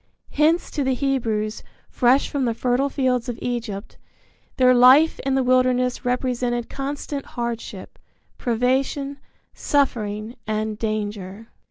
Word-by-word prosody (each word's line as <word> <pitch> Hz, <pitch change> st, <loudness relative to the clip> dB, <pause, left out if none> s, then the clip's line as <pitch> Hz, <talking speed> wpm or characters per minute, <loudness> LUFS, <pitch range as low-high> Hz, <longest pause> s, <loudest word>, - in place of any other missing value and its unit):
Hence, 315 Hz, +4 st, +2 dB
to 290 Hz, -, -1 dB
the 265 Hz, -1 st, +1 dB
Hebrews, 230 Hz, -6 st, -1 dB, 0.3 s
fresh 255 Hz, +2 st, +3 dB
from 280 Hz, -3 st, -1 dB
the 230 Hz, -2 st, 0 dB
fertile 255 Hz, +4 st, +1 dB
fields 255 Hz, -4 st, 0 dB
of 235 Hz, -, -4 dB
Egypt, 230 Hz, -4 st, -4 dB, 0.6 s
their 255 Hz, -1 st, +5 dB
life 260 Hz, +6 st, +6 dB
in 270 Hz, 0 st, -1 dB
the 265 Hz, -, +2 dB
wilderness 255 Hz, 0 st, +2 dB
represented 245 Hz, -1 st, -1 dB
constant 280 Hz, 0 st, -4 dB
hardship, 235 Hz, -1 st, -6 dB, 0.4 s
privation, 265 Hz, +4 st, 0 dB, 0.3 s
suffering 220 Hz, -5 st, -1 dB
and 215 Hz, 0 st, -2 dB
danger. 210 Hz, -1 st, -4 dB
250 Hz, 120 wpm, -22 LUFS, 225-270 Hz, 0.6 s, life